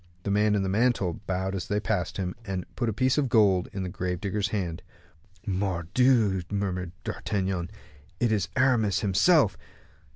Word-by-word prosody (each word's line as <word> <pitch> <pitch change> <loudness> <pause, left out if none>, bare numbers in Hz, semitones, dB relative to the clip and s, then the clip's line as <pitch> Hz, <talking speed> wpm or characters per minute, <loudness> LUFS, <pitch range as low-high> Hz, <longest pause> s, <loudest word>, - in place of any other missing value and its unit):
The 100 - -2
man 105 +1 +3
in 100 - +1
the - - -1
mantle 100 -4 +1
bowed 95 +1 -1
as 95 -3 -4
they 105 - 0
passed 105 -4 -2
him, 90 -2 -2
and 95 -4 -4
put 120 -2 -1
a - - 0
piece 130 +6 +1
of 135 -3 0
gold 100 -6 +4
into 95 - -6
the 90 - -3
grave 90 0 -3
digger's 100 +1 -1
hand. 90 -5 -3 0.6
"Mordioux!" 95 +3 +2
murmured 90 -3 -2
D'Artagnan; 95 -2 -2 0.5
"it 120 -2 +2
is 100 -6 0
Aramis 120 -6 +2
himself." 105 - +3
100 Hz, 165 wpm, -27 LUFS, 90-110 Hz, 0.6 s, gold